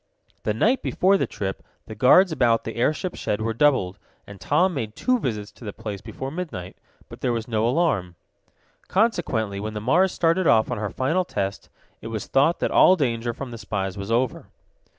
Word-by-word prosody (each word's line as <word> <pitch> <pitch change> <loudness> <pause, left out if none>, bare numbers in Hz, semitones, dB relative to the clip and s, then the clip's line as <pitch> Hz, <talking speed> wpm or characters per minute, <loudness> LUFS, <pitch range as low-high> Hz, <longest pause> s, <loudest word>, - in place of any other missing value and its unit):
The 105 - -1
night 235 - +2
before 190 +2 +2
the - - 0
trip 95 -1 -4 0.2
the - - -8
guards 150 - +5
about 120 -6 +2
the 115 - -6
airship 155 +9 0
shed 105 - -2
were 110 +1 -1
doubled, 115 -8 +2 0.3
and 100 -2 -12
Tom 180 +6 +2
made 110 -7 -4
two 255 -1 +1
visits 105 - -3
to - - -17
the 105 - -5
place 105 -3 -6
before 130 +5 -6
midnight. 150 - -6 0.3
But - - -12
there 125 - +1
was 115 -1 -3
no 110 -1 0
alarm. 120 - 0 0.7
Consequently, 145 - 0
when 110 +1 -5
the - - -2
Mars 170 - +3
started 165 +1 +1
off 110 -1 +4
on - - -2
her 105 -1 -2
final 155 - 0
test, 100 - -4 0.3
it - - -7
was 110 -2 -4
thought 145 +6 +2
that - - 0
all 185 - +6
danger 120 -7 -1
from 125 +2 -7
the 115 - -8
spies 100 -3 -3
was 100 0 -6
over. 120 +2 0
115 Hz, 195 wpm, -24 LUFS, 105-160 Hz, 0.7 s, all